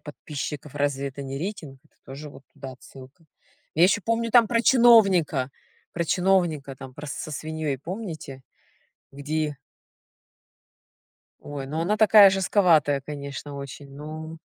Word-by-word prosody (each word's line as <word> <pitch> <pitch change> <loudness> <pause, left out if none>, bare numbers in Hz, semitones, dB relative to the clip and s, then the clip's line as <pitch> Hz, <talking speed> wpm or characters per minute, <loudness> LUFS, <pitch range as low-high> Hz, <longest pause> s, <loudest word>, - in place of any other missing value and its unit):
подписчиков 150 -1 -7
разве 140 -1 -1
это 140 +1 -8
не 135 0 -5
рейтинг? 155 -6 -6
Это - - -31
тоже 140 +3 -9
вот 140 - -14
туда 135 -2 -9
отсылка. 130 +4 -15 0.5
Я 165 +3 +5
ещё 200 - +3
помню 230 0 0
там 230 -2 +6
про 230 -1 +2
чиновника, 195 - +5 0.4
про 170 - -2
чиновника 175 -6 +1
там 130 0 -10
про 145 +1 -9
с 140 - -5
со - - -6
свиньёй 155 -2 -4
помните, 160 - -7 0.7
где 150 +1 -3 1.9
Ой, 140 -2 -6
ну 155 +4 -3
она 200 +6 0
такая 210 -1 +8
жестковатая, 175 -7 +3
конечно, 140 -1 -7
очень, 140 0 -9
ну. 155 +2 -8
150 Hz, 135 wpm, -25 LUFS, 140-185 Hz, 1.9 s, такая